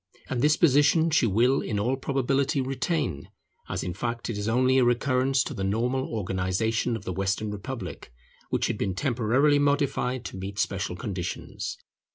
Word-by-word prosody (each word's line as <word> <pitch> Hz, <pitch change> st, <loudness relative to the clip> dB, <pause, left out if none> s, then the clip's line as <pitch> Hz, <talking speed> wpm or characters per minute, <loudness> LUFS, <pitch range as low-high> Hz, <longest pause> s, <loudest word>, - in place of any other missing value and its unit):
And 125 Hz, -2 st, 0 dB
this 150 Hz, +2 st, +4 dB
position 160 Hz, +2 st, +4 dB
she 145 Hz, -6 st, +4 dB
will 120 Hz, +7 st, +3 dB
in 105 Hz, -, -2 dB
all 120 Hz, +6 st, +1 dB
probability 135 Hz, +2 st, 0 dB
retain, 130 Hz, -, -2 dB, 0.4 s
as -, -, -2 dB
in 90 Hz, -, -3 dB
fact 115 Hz, +4 st, -3 dB
it 105 Hz, -, -4 dB
is 105 Hz, -, -3 dB
only 130 Hz, +3 st, +3 dB
a -, -, +4 dB
recurrence 130 Hz, +2 st, +2 dB
to -, -, -5 dB
the 95 Hz, -, -4 dB
normal 120 Hz, +7 st, 0 dB
organization 110 Hz, +3 st, -1 dB
of 110 Hz, -, -7 dB
the 95 Hz, -, -3 dB
Western 100 Hz, +3 st, -1 dB
Republic, 105 Hz, -, -6 dB, 0.4 s
which -, -, 0 dB
had -, -, -2 dB
been 95 Hz, -2 st, -1 dB
temporarily 130 Hz, +5 st, +2 dB
modified 140 Hz, -3 st, 0 dB
to -, -, -6 dB
meet 95 Hz, +2 st, -6 dB
special 95 Hz, -4 st, -1 dB
conditions. 90 Hz, -2 st, -5 dB
120 Hz, 170 wpm, -27 LUFS, 100-135 Hz, 0.4 s, this